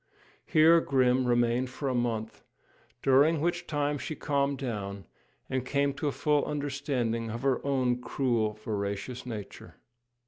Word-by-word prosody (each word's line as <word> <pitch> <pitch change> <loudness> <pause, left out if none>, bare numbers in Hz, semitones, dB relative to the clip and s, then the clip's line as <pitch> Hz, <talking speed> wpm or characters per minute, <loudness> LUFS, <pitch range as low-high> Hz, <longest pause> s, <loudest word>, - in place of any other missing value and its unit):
Here 165 +2 +6
Grim 130 -2 +2
remained 120 +1 +2
for 135 +2 -5
a 130 - 0
month, 115 -3 -2 0.6
during 145 +4 +4
which 175 +2 -1
time 145 -1 -1
she 155 - -5
calmed 140 -1 0
down, 100 -6 -5 0.4
and 130 -2 -1
came 140 +2 0
to 150 +2 -3
a - - +1
full 150 +1 +1
understanding 135 -6 -2
of 115 +3 -5
her 135 -2 +1
own 130 -3 +1
cruel, 120 -6 0
voracious 105 +3 -4
nature. 105 -4 -8
130 Hz, 140 wpm, -29 LUFS, 115-145 Hz, 0.6 s, Here